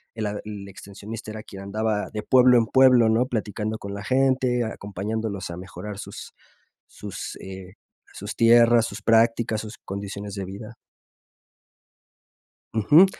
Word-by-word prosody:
el 110 -1 -3
a 105 0 -4
el 100 -2 -7
extensionista 105 +3 -9
era 110 0 -7
quien 95 -4 -10
andaba 105 +1 -2
de 105 -1 -4
pueblo 125 0 +6
en 115 -2 +2
pueblo, 130 -3 +6
¿no? 115 +3 +3
Platicando 110 -1 -3
con 100 -1 -7
la 100 0 -6
gente, 130 0 +2
acompañándolos 105 -1 -4
a 85 - -6
mejorar 100 +2 -8
sus - - -9 0.6
sus, - - -7
eh, 95 0 -9 0.4
sus - - -7
tierras, 115 0 +6
sus - - -7
prácticas, 115 -1 +3
sus 110 0 -9
condiciones 100 +1 -6
de 100 -1 -4
vida. 105 +4 -9 2.0
Ujú. 145 - +6
110 Hz, 140 wpm, -24 LUFS, 100-115 Hz, 2.0 s, pueblo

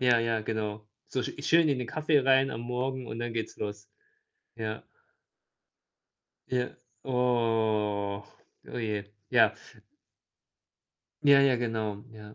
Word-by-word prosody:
Ja, 125 -2 +5
ja, 115 -1 +1
genau. 105 -1 -3 0.2
So 130 - -1
sch - - -4
schön 165 0 +5
in 140 -3 +1
den 125 - -3
Kaffee 155 +2 +2
rein 135 0 +4
am 115 - -5
Morgen 125 +1 -2
und 115 - -6
dann 120 0 -3
geht's 115 -1 -3
los. 105 0 -6 0.7
Ja. 110 -1 -4 1.7
Ja. 125 -1 -1 0.3
Oh. 110 -5 +1 0.4
Oh, - - -4
je. 105 -2 -3 0.2
Ja. - - +5 1.7
Ja, 140 -1 +7
ja, 135 -2 +5
genau. 110 -3 -2
Ja. 105 -1 -12
115 Hz, 125 wpm, -29 LUFS, 105-130 Hz, 1.7 s, Ja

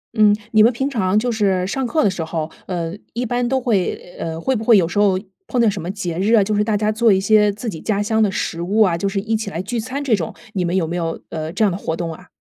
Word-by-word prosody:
嗯， 210 -2 +5 0.2
你 215 -1 +5
们 230 - +6
平 265 +3 -2
常 210 -7 0
就 240 +2 +1
是 195 -4 +1
上 255 +6 -2
课 310 +4 +1
的 200 - +4
时 180 -3 -3
候， 160 -1 -3 0.2
呃， 170 -2 -3 0.2
一 245 +2 -2
般 245 +1 0
都 265 0 +1
会 200 -7 -1
呃， 165 0 -4
会 260 +10 0
不 220 - -3
会 225 -1 +6
有 170 -4 +3
时 190 +4 -2
候 195 -2 +4 0.3
碰到 240 -3 +2
什 200 -4 -1
么 170 - -5
节 180 -4 -4
日 205 +5 +2
啊， 215 -3 +6
就 210 +2 -1
是 210 - +2
大 210 -1 0
家 215 +1 +1
做 225 0 +3
一 190 - +4
些 210 +1 +4
自 215 +4 -7
己 165 -7 -5
家 205 -2 0
乡 220 +1 +1
的 210 - +4
食 170 -2 -3
物 205 +5 +1
啊， 185 -5 +4
就 195 +4 -1
是 195 - -1
一 220 +3 -1
起 215 -2 -3
来 170 - -5
聚 230 +4 -3
餐 260 +5 -4
这 245 -5 +3
种， 170 -6 -4 0.2
你 185 - -1
们 175 +1 -1
有 185 -4 +2
没 165 - -4
有， 165 -2 -2
呃， 155 -1 -4
这 215 +5 +1
样 200 - +2
的 175 - -3
活 160 - -2
动 165 -1 -4
啊？ 180 +3 -14
205 Hz, 325 characters per minute, -20 LUFS, 180-225 Hz, 0.3 s, 们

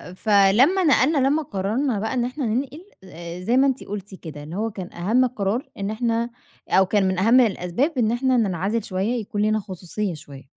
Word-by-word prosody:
فلمّا 215 - +4
نقلنا 295 -1 +3
لما 275 +4 +2
قررنا 215 +3 -1
بقى 220 +4 -2
إن 245 -2 0
إحنا 255 +2 -4
ننقل 265 +8 -3 0.2
آآ 170 -1 -9
زي 235 +7 +1
ما 275 +1 +5
أنتِ 265 -1 -1
قُلتِ 200 -1 -7
كده 150 -5 -9
اللي 160 +4 -8
هو 225 +2 -2
كان 185 -3 -8
أهَم 220 +9 +2
القرار 230 +2 -2
إن 200 0 -3
إحنا 230 +1 -1 0.4
أو 190 0 +4
كان 200 0 +1
من 185 -1 -1
أهَم 230 +6 +5
الأسباب 235 - 0
إن 225 -2 +2
إحنا 255 +1 +1
ننعزِل 200 +1 0
شوية 210 +5 -2
يكون 205 0 -4
لينا 215 +1 +2
خصوصية 190 0 -4
شوية. 140 -3 -11
215 Hz, 195 wpm, -23 LUFS, 190-250 Hz, 0.4 s, ما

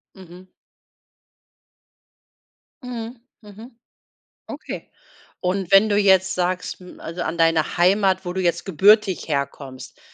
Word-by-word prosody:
Mhm. 185 0 -14 2.4
Mhm, 240 -1 -6 0.3
mhm. 225 +3 -14 0.7
Okay, - - -8 0.5
und 185 0 -2
wenn 200 +2 +6
du 205 - +2
jetzt 190 -2 +3
sagst, 180 +1 -2
hm 180 -1 -14
also, 170 +1 -6
an 165 +2 -4
deiner 165 -1 +1
Heimat, 190 +1 +2
wo 175 - -4
du 190 - -2
jetzt 170 -1 0
gebürtig 195 +2 +3
herkommst, 140 -3 -5
185 Hz, 115 wpm, -22 LUFS, 170-205 Hz, 2.4 s, wenn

